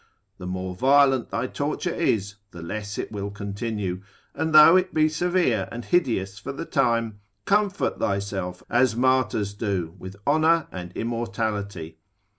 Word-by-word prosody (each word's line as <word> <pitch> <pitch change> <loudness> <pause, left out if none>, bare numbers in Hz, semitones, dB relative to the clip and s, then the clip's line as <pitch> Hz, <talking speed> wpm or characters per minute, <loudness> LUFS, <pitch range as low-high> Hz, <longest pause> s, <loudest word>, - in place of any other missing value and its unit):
The 90 - -6
more 95 0 -4
violent 135 +3 +3
thy - - -2
torture - - -2
is, 105 -1 0
the 85 -3 -10
less 105 +4 -5
it - - -4
will 100 -1 -4
continue: 100 -2 -4 0.3
and 160 - -2
though 155 +3 +9
it 185 0 +1
be 155 0 +4
severe 155 - 0
and 120 0 -6
hideous 105 - 0
for - - -6
the 140 +4 -6
time, 115 -8 0 0.3
comfort 205 -1 +1
thyself 100 -2 -2
as 120 -1 +2
martyrs 120 -5 +1
do, 100 -6 -2
with 95 +2 -9
honour 160 +2 +3
and 90 -1 -7
immortality. 105 -8 -3
110 Hz, 145 wpm, -24 LUFS, 100-135 Hz, 0.3 s, though